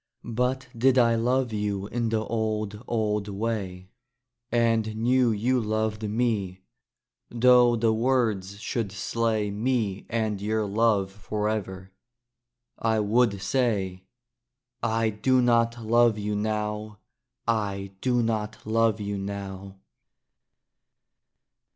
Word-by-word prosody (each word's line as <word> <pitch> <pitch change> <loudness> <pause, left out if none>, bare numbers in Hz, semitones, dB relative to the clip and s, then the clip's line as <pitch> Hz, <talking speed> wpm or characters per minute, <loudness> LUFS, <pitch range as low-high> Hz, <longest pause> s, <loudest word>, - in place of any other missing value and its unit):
But 130 +2 0
did 130 +3 +3
I 120 -2 +5
love 120 +1 +1
you 105 -2 -2
in 115 +2 -2
the 110 -1 0
old, 110 -1 -2
old 105 -3 0
way, 100 -3 -4 0.6
And 115 -2 +1
knew 125 +2 +3
you 120 +4 +1
loved 110 0 -1
me 105 -5 -1 0.7
'though 120 0 +5
the 115 -1 +2
words 110 -5 0
should 110 -2 -3
slay 110 0 -1
Me 105 -2 -1
and 110 -3 -1
your 110 +1 0
love 100 -2 +1
forever, 100 -2 -3 0.9
I 110 -1 +1
would 105 -1 +2
say, 100 -6 0 0.8
"I 115 -1 +1
do 130 +5 +2
not 115 -1 +2
love 115 0 +4
you 105 0 -2
now! 105 0 -2 0.5
I 100 -4 -1
do 125 -2 +2
not 110 -1 -2
love 110 -1 +2
you 100 -1 -3
now!" 95 -1 -6
110 Hz, 110 wpm, -26 LUFS, 100-115 Hz, 0.9 s, I